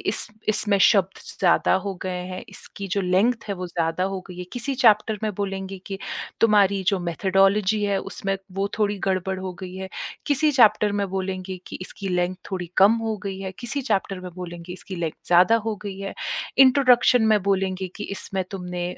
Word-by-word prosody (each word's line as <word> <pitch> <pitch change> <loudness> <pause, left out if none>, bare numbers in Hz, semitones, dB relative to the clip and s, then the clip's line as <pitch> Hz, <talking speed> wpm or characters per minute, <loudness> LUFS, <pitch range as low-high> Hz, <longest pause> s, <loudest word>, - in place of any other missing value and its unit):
इस 200 - +2 0.2
इसमें 210 -1 +4
शब्द 195 -3 +4 0.2
ज़्यादा 180 -3 +3
हो 200 - -3
गए 185 -1 -3
हैं, 185 - -6
इसकी 200 - -6
जो 200 - +1
लेंथ 195 +6 +2
है 200 - -1
वो 180 -1 -5
ज़्यादा 170 0 -1
हो 190 0 -3
गई 180 - -9
है। 180 - -4
किसी 260 +3 -2
चैप्टर 220 -3 +4
में 215 -1 -1
बोलेंगे 195 -1 -4
कि 195 -1 -5 0.4
तुम्हारी 200 -3 +4
जो 200 -2 +3
मेथोडोलॉजी 195 +4 +2
है 200 -1 +1
उसमें 195 +1 -3 0.2
वो 195 - +1
थोड़ी 205 -1 +1
गड़बड़ 190 0 -1
हो 185 -1 -4
गई 185 -1 -7
है। 190 0 -6 0.4
किसी 300 +1 +3
चैप्टर 215 -5 +5
में 200 -1 0
बोलेंगे 190 0 -3
कि - - -6
इसकी 195 +2 -6
लेंथ 180 0 0
थोड़ी 180 -3 -4
कम 195 +3 +7
हो 220 -1 -1
गई 195 -1 -4
है। 190 -1 -5
किसी 270 +4 -3
चैप्टर 195 -5 -1
में 180 0 -7
बोलेंगे 175 -1 -7
इसकी 185 +1 -8
लेंथ 165 -2 -2
ज़्यादा 180 +6 +5
हो 215 - -2
गई 200 -2 -6
है। 195 0 -5 0.4
इंट्रोडक्शन 255 -2 +6
में 210 - +4
बोलेंगे 190 -1 0
कि - - -5
इसमें 195 -1 -2
तुमने 180 -2 -4
195 Hz, 190 wpm, -24 LUFS, 185-210 Hz, 0.4 s, कम